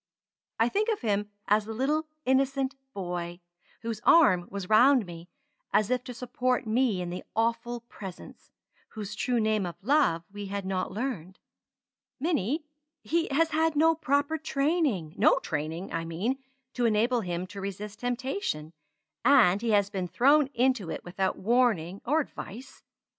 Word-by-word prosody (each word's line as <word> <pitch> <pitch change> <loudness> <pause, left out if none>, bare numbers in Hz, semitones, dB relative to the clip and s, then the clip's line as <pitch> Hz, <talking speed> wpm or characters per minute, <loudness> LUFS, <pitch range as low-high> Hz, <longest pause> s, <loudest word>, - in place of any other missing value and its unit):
I 225 - +3
think 420 - 0
of 440 - -1
him 210 -3 0 0.2
as 210 +1 +3
the 220 0 -6
little 300 +6 0 0.2
innocent 270 0 +1 0.2
boy, 175 -3 -4 0.4
whose 225 -2 -4
arm 185 - +5
was 200 -2 -5
round 245 +3 +5
me 170 0 -10 0.4
as 215 +2 +2
if 250 -1 +1
to 250 - -6
support 250 +1 -1
me 220 -4 +1
in 175 - -5
the 180 - -5
Awful 230 +1 0
Presence, 195 -6 -11 0.4
whose 210 -2 -6
true 240 +3 0
name 215 -2 +1
of 175 -2 -4
Love 245 - +3
we 205 -1 -6
had 200 0 -4
not 190 -1 -2
learned. 200 -6 -4 0.8
Minnie! 300 - 0 0.4
he 335 +1 0
has 325 +4 +2
had 320 0 +2
no 325 +2 +5
proper 295 0 0
training 275 - 0
no - - +5
training, 160 +4 -4
I 165 - -1
mean, 190 +11 -2 0.3
to 245 - 0
enable 230 +3 +2
him 175 -1 -3
to 195 +1 -9
resist 200 +2 -6
temptation 245 - -3 0.5
and 225 -7 +5
he 235 - -1
has 205 -2 +3
been 190 -3 -2
thrown 280 - +4
into 250 -7 +1
it - - -5
without 190 +2 -2
warning 205 -5 +1
or 305 +5 +3
advice. 250 -3 -9
225 Hz, 155 wpm, -28 LUFS, 190-270 Hz, 0.8 s, arm